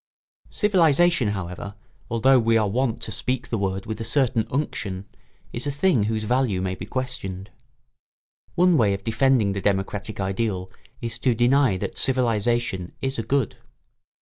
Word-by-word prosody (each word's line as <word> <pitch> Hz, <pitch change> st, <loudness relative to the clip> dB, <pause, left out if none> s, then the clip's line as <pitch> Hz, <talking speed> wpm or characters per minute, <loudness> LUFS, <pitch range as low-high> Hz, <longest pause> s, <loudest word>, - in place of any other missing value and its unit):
] -, -, -33 dB
Civilisation, 175 Hz, -, +4 dB
however, 95 Hz, 0 st, -5 dB, 0.3 s
although 125 Hz, +3 st, +4 dB
we 115 Hz, -1 st, +3 dB
are 110 Hz, -2 st, +2 dB
wont 120 Hz, +3 st, 0 dB
to -, -, -4 dB
speak 125 Hz, +4 st, -2 dB
the 115 Hz, -, -1 dB
word 95 Hz, 0 st, -2 dB
with 110 Hz, +1 st, -5 dB
a -, -, -1 dB
certain 115 Hz, -1 st, +1 dB
unction, 100 Hz, -9 st, -3 dB, 0.5 s
is 120 Hz, +4 st, -4 dB
a -, -, 0 dB
thing 140 Hz, -, +2 dB
whose 110 Hz, 0 st, -1 dB
value 120 Hz, -4 st, +1 dB
may 95 Hz, 0 st, -2 dB
be -, -, -7 dB
questioned. 125 Hz, -7 st, -4 dB, 1.0 s
One 180 Hz, -1 st, +4 dB
way 105 Hz, -5 st, +3 dB
of 100 Hz, -, -9 dB
defending 115 Hz, -2 st, +2 dB
the 100 Hz, -, -3 dB
democratic 100 Hz, +2 st, -2 dB
ideal 95 Hz, -1 st, -2 dB, 0.3 s
is 115 Hz, -1 st, -4 dB
to 125 Hz, -3 st, +2 dB
deny 125 Hz, -2 st, +3 dB
that -, -, -4 dB
civilisation 120 Hz, -6 st, 0 dB
is 135 Hz, -2 st, -2 dB
a -, -, -1 dB
good. 135 Hz, -3 st, 0 dB
115 Hz, 160 wpm, -24 LUFS, 100-130 Hz, 1.0 s, Civilisation